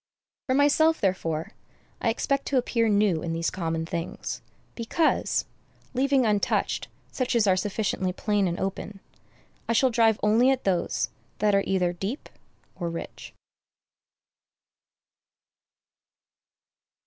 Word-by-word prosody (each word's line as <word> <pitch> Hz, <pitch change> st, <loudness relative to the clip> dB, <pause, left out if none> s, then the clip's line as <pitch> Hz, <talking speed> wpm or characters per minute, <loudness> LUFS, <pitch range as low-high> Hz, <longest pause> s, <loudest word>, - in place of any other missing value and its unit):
For 260 Hz, -, +2 dB
myself, 315 Hz, +3 st, +4 dB
therefore, 165 Hz, -5 st, -1 dB, 0.5 s
I 230 Hz, -, +2 dB
expect 275 Hz, +4 st, -1 dB
to 275 Hz, -, +1 dB
appear 230 Hz, -2 st, +1 dB
new 200 Hz, -6 st, +2 dB
in 165 Hz, -1 st, -3 dB
these 165 Hz, 0 st, -1 dB
common 165 Hz, -2 st, -2 dB
things, 170 Hz, -1 st, -4 dB, 0.3 s
because, 250 Hz, +7 st, 0 dB, 0.5 s
leaving 265 Hz, 0 st, +2 dB
untouched 210 Hz, -2 st, 0 dB, 0.2 s
such 255 Hz, -1 st, -1 dB
as 230 Hz, -3 st, +4 dB
are 190 Hz, -2 st, +4 dB
sufficiently 190 Hz, -1 st, -1 dB
plain 205 Hz, +1 st, 0 dB
and 175 Hz, 0 st, -3 dB
open, 195 Hz, +1 st, -4 dB, 0.7 s
I -, -, +3 dB
shall 255 Hz, +2 st, +3 dB
drive 225 Hz, -2 st, +3 dB
only 225 Hz, +5 st, +4 dB
at 265 Hz, -1 st, +1 dB
those 185 Hz, -3 st, 0 dB, 0.3 s
that 210 Hz, -1 st, +2 dB
are 195 Hz, 0 st, +3 dB
either 180 Hz, -2 st, +1 dB
deep 195 Hz, -, -5 dB, 0.5 s
or 170 Hz, -2 st, -3 dB
rich. 165 Hz, -, -8 dB
210 Hz, 120 wpm, -26 LUFS, 180-245 Hz, 0.7 s, myself